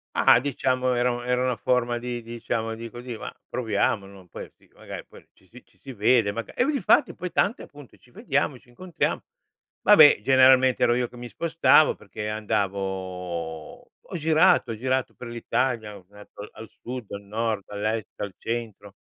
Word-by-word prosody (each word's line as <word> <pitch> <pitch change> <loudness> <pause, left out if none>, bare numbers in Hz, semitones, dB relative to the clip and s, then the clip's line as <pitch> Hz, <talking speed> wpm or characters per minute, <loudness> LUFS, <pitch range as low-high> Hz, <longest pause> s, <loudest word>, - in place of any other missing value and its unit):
Ma, - - +6
diciamo 130 -1 0
era 125 +1 +1
un 120 0 -5
era 125 0 +1
una 125 -3 0
forma 120 +1 0
di 120 0 -5
diciamo 115 -1 -4
di 115 +1 -8
così, 120 0 -8
ma - - -6 0.2
proviamo, 105 -3 0
non 95 -3 -15
puoi - - -9
sì - - -27
magari - - -9
poi - - -17
ci 95 - -27
si 125 +6 -15
ci 120 -5 -31
si 135 +8 -10
vede, 110 -2 +2
magari 115 - -5
e 270 +4 +2
difatti, 275 -11 +2
poi 180 -1 -6
tante 210 - 0
appunto: 145 -3 -15
"Ci 125 - -25
vediamo 140 +2 -1
e 125 - -14
ci 125 - -25
incontriamo." 175 +7 -3 0.6
Vabbè, - - +7
generalmente 130 +1 +5
ero 120 - +4
io 125 0 0
che 125 - -15
mi 120 - -7
spostavo 165 -1 +3
perché, 105 +1 -7
andavo 95 -6 -4 0.2
ho - - -5
girato, 155 -5 +3
ho 110 - -5
girato 130 +2 -1
per 125 - -9
l'Italia, 120 -2 -2
ho 90 - -18
girato 105 0 -12
al 110 0 -11
sud, 125 -3 -7
al 100 - -6
nord, 110 0 -2
all'est, 105 +1 -3
al 100 -3 -6
centro. 110 -3 -5
120 Hz, 185 wpm, -25 LUFS, 105-130 Hz, 0.6 s, Vabbè